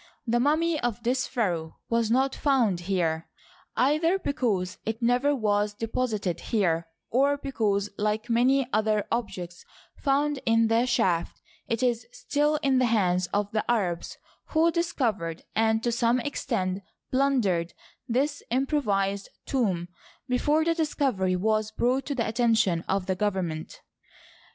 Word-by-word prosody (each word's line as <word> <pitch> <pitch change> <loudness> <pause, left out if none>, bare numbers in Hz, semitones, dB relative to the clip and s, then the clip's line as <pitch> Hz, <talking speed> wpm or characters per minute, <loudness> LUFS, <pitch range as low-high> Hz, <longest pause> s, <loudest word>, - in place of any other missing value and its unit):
The 240 0 +1
mummy 310 +4 +2
of 240 -3 -2
this 250 +2 0
pharaoh 175 - -2
was 230 -1 +1
not 265 +3 +2
found 245 - +2
here, 170 -3 -1 0.5
either 310 +7 +3
because 215 - -1
it 220 0 -3
never 245 +5 +2
was 210 -3 0
deposited 220 -5 -2
here, 170 -7 0 0.2
or 280 +4 +3
because, 210 -8 -1
like 215 +2 0
many 250 +3 +3
other 215 -1 +2
objects 180 -7 -4 0.3
found 285 0 +1
in 225 0 +3
the 230 +2 +3
shaft, 180 -8 +1 0.3
it 230 +1 -1
is 240 -2 0
still 300 -10 0
in 270 -2 +3
the 255 - +3
hands 185 -5 +2
of 205 +1 -1
the 215 - 0
Arabs 185 -8 -1 0.3
who 330 +1 +3
discovered 225 - -1
and 220 0 +2
to 240 - +1
some 235 +1 +2
extent 215 -9 -2 0.3
plundered 235 -11 +1 0.3
this 280 +4 0
improvised 205 -7 0 0.2
tomb 190 -10 0 0.4
before 295 +5 +2
the 335 - +3
discovery 270 - 0
was 215 +3 +1
brought 250 +4 0
to 285 - -2
the 230 -3 0
attention 220 -7 +2
of 195 -1 0
the 190 - 0
government. 185 -6 -3
230 Hz, 135 wpm, -27 LUFS, 195-265 Hz, 0.5 s, either